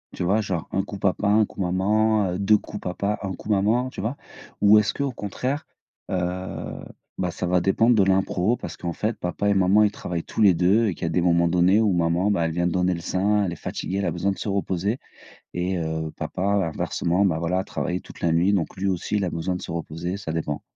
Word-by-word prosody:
Tu - - -3
vois 100 +5 +2
genre 95 -6 -3
un 95 - 0
coup 100 0 -7
papa, 100 +1 +1
un 105 +1 +4
coup - - -15
maman, 100 +2 +2
heu, 90 - -3
2 105 +2 +4
coups 105 - -8
papa, 100 +3 -2
1 95 -2 -3
coup 105 - -10
maman, 110 +5 +2
tu - - -10
vois? 115 +6 -2 0.5
Ou 105 +1 +7
est-ce 105 - 0
qu'au 140 -1 -2
contraire, 125 +6 -4 0.4
heu, - - 0 1.0
bah 90 - -1
ça 90 - -4
va 90 0 +2
dépendre 115 +6 +3
de 105 - +5
l'impro, 95 +2 +2
parce - - -8
qu'en 85 -1 -4
fait 110 +5 -2
papa 90 +3 -1
et - - +4
maman, 95 +2 +4
ils 105 - +3
travaillent 85 -4 -4
tous - - -4
les 100 -3 +7
2, 95 +7 +3
et 100 - 0
qu'il - - -9
y - - +1
a - - 0
des 80 +2 +1
moments 85 -1 +3
donnés 90 +4 +4
où 105 -2 +3
maman, 85 +3 +1
bah, 85 -5 +1
elle 80 - -1
vient 85 +1 +1
de - - -1
donner 90 +1 +1
le 85 - -5
sein, 100 +4 +1
elle 90 - -1
est - - -5
fatiguée, 95 - -4
elle 100 - -1
a 85 - 0
besoin 95 +4 0
de 95 - -5
se - - -4
reposer 100 +2 -1 0.6
et 90 +1 -1
heu, 80 -1 -3
papa 90 - -4 0.3
inversement, 90 +4 0
bah 80 -4 +1
voilà, 85 +2 0
a - - -1
travaillé 90 -1 -3
toute - - -14
la 85 - +2
nuit, 85 +5 +3
donc 90 -5 -1
lui 95 +1 -1
aussi, 95 +2 -1
il 100 -2 +1
a - - -1
besoin 85 +2 -2
de 90 - -6
se - - -6
reposer, 85 +2 -4
ça 100 -5 -5
dépend. 75 -2 -3
95 Hz, 250 wpm, -24 LUFS, 90-105 Hz, 1.0 s, Ou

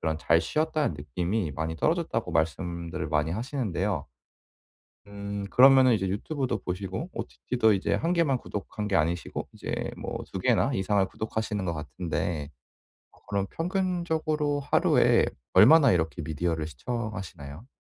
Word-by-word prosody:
그런 80 -1 -1
잘 80 +1 +3
쉬었다는 155 - 0
느낌이 85 +5 -2
많이 80 +3 -3
떨어졌다고 80 - 0
말씀들을 85 -1 -2
많이 75 +1 +1
하시는데요. 105 -4 -2 1.0
음 100 0 -5
그러면은 130 0 +7
이제 100 -4 +1
유튜브도 130 +8 -2
보시고 95 - -4
OTT도 115 -3 0
이제 95 - -1
1 165 +2 0
개만 155 -7 +2
구독한 105 -1 -5
게 100 - +2
아니시고 85 +2 -1
이제 - - -4
뭐 - - -5
2 - - -3
개나 - - +2
이상을 95 +1 +2
구독하시는 110 0 -3
것 85 - 0
같은데 75 +1 -3 0.6
어 - - -23
그럼 100 -1 0
평균적으로 165 -5 -1
하루에 140 - +3 0.3
얼마나 155 -5 +7
이렇게 80 -4 0
미디어를 80 0 -2
시청하시나요? 95 - -6
100 Hz, 345 characters per minute, -27 LUFS, 85-130 Hz, 1.0 s, 그러면은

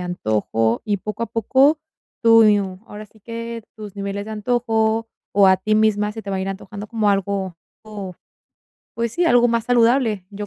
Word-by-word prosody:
antojo 115 -9 -1
y, 205 -2 -1
poco 215 +4 -5
a - - -1
poco, 265 +7 +2 0.4
tu, 225 -1 +7
y 210 -1 +5
u 190 +1 -7
ahora 210 +1 -10
sí 220 - -25
que 230 +1 -7
tus 210 -2 -10
niveles 200 +1 -4
de 220 - -6
antojo 225 0 0 0.2
o 200 -1 +5
a 190 0 +5
ti 215 +3 -1
misma 210 -1 +2
se 225 - -7
te 210 - -11
va 195 - -1
a - - -2
ir 190 - -3
antojando 205 +1 -8
como 220 -1 0
algo, 195 -1 0
o, 175 -3 -11 1.4
pues 230 -1 -2
sí, 350 0 +1
algo 245 -5 +4
más 230 -1 0
saludable. 235 -4 +2
Yo 205 +1 -6
215 Hz, 195 wpm, -21 LUFS, 200-230 Hz, 1.4 s, tu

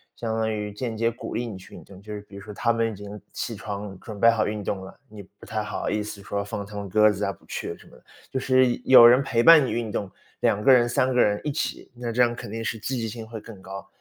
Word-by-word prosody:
相 115 -2 -3
当 110 0 0
于 105 -1 -4
间 115 +2 -4
接 115 +1 +1
鼓 115 - -7
励 120 +1 -2
你 105 -4 -7
去 95 +1 -15
运 - - -11
动。 95 -1 -14
就 105 +1 -8
是 105 - -6
比 100 -1 -16
如 100 - -8
说 105 +1 -9
他 115 +3 +1
们 115 -1 0
已 - - -8
经 105 +1 -9
起 115 - -4
床， 100 -1 -6
准 110 -3 -9
备 115 - +7
好 115 -2 +2
运 105 0 -3
动 100 0 -2
了， 95 - -13
你 105 -2 -10
不 100 +3 -18
太 110 +1 -2
好 105 - -3
意 105 0 -1
思 105 -1 -8
说， 100 +1 -3
放 100 0 -5
他 105 +1 -11
们 100 -1 -5
鸽 105 +3 +5
子 100 0 -2
啊， 100 - -2
不 - - -23
去 - - -5
什 - - -18
么 - - -17
的， - - -24 0.3
就 130 - -2
是 130 0 +4 0.2
有 130 -3 +9
人 125 +3 +6
陪 115 -3 +1
伴 160 +1 +8
你 - - -3
运 115 -2 -2
动， 100 -2 -3 0.3
2 105 - +2
个 135 - +5
人， 120 -2 +6
3 130 +2 +1
个 125 - +1
人 105 -3 +3
一 150 - -1
起， 140 - -4
那 120 -1 -4
这 125 - +1
样 120 -1 +3
肯 100 - -8
定 115 +1 -4
是 110 - -2
积 130 +5 -3
极 115 - -2
性 110 0 -7
会 110 -1 -8
更 110 -2 -12
高。 95 +1 -8
110 Hz, 315 characters per minute, -25 LUFS, 100-120 Hz, 0.3 s, 有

